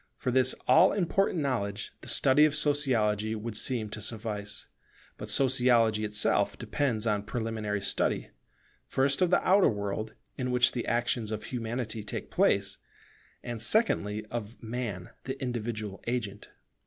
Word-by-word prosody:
For 125 - -2
this 130 0 +3
all 185 - +6
important 190 -2 +1
knowledge, 105 -7 -2
the - - -12
study 135 +2 +5
of 155 -1 +1
Sociology 115 -8 +1
would 110 0 -5
seem 115 -1 0
to 105 - -6
suffice: 105 -2 -3 0.5
but - - -8
Sociology 120 -5 +3
itself 105 0 +1
depends 120 -6 -1
upon 105 -2 0
preliminary 110 -3 -3
study, 100 - -1 0.6
first 135 +3 +1
of 180 - +4
the 180 - +2
outer 195 +1 +5
world, 105 +1 -4 0.2
in 125 -1 -1
which 125 0 +4
the 120 - -4
actions 120 -2 0
of 105 -1 -4
Humanity 115 -2 -4
take 105 - -5
place; - - +2 0.6
and 120 -2 -5
secondly, 110 - +2
of 120 0 -6
Man, 110 -6 -5
the 135 +1 -5
individual 110 -5 -4
agent. 110 -4 -3
115 Hz, 140 wpm, -29 LUFS, 105-130 Hz, 0.6 s, all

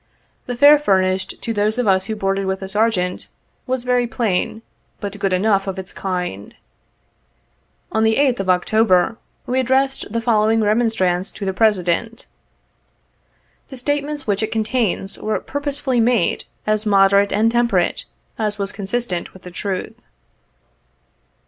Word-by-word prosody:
The 245 - -3
fare 290 +3 +7
fur 200 -10 +3
nished, 185 0 -2
to 230 - -3
those 210 +2 0
of 245 -3 0
us 190 -1 +3
who 220 - -3
boarded 195 -1 -1
with 190 0 -2
the 190 - -5
Sergeant, 190 -3 0 0.4
was 255 -1 -1
very 250 -1 +1
plain, 220 -1 -1 0.4
but 205 -1 -6
good 195 -1 0
enough 195 +1 +2
of 190 0 -3
its 190 0 -7
kind. 180 - -4 1.4
On 220 - +1
the 220 0 +3
8th 265 -2 +2
of 195 -1 -2
October 185 +2 +3 0.3
we 255 +1 0
addressed 265 -2 +1
the 230 - -1
following 225 -1 +2
remon 220 +3 +2
strance 185 -3 0
to 200 - -5
the 190 - -1
President. 210 +2 0 1.4
The 265 - -9
statements 290 +2 -2
which 205 -1 0
it 220 0 -2
contains, 220 -3 -1
were 215 - -1
purposely 285 -3 -2
made 230 -5 +1 0.2
as 215 0 +1
moderate 200 -1 +4
and 220 +2 +2
temperate 235 -7 +1 0.3
as 210 -1 -1
was 200 -1 -3
con 200 -2 -7
sistent 200 -6 -3
with 190 - -15
the 180 - -9
truth. 190 +3 -4
215 Hz, 155 wpm, -20 LUFS, 190-240 Hz, 1.4 s, fare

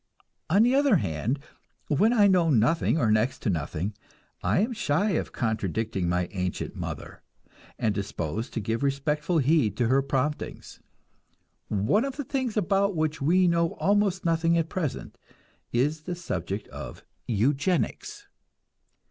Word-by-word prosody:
On 195 +7 +5
the 245 +2 +3
other 275 -4 +4
hand, 105 - -1 0.5
when 200 +10 +3
I 220 -4 +5
know 180 -4 +4
nothing 150 +6 +3
or 115 -8 +2
next 110 +4 +1
to 105 - +1
nothing, 85 +4 -3 0.5
I - - +2
am 235 +4 0
shy 200 -1 +1
of 170 - -1
contradicting 110 -4 -1
my 90 0 0
ancient 90 -2 -3
mother, - - -6 0.6
and 110 -2 +1
disposed 100 - -4
to - - 0
give 110 +2 -2
respectful 150 +4 0
heed 135 - +2
to 120 -2 +1
her 135 +2 +4
promptings. 140 +2 -3 0.9
One 105 - +1
of 275 -1 -3
the 290 - -2
things 260 -4 -2
about 200 0 +2
which 155 -1 -1
we 180 +6 +4
know 170 -1 +2
almost 200 -2 +1
nothing 165 0 +2
at 165 -1 0
present 160 -7 -4 0.5
is 145 +6 +1
the 175 +3 -4
subject 100 - -4
of - - -9 0.2
eugenics. 135 - 0
150 Hz, 145 wpm, -27 LUFS, 110-185 Hz, 0.9 s, On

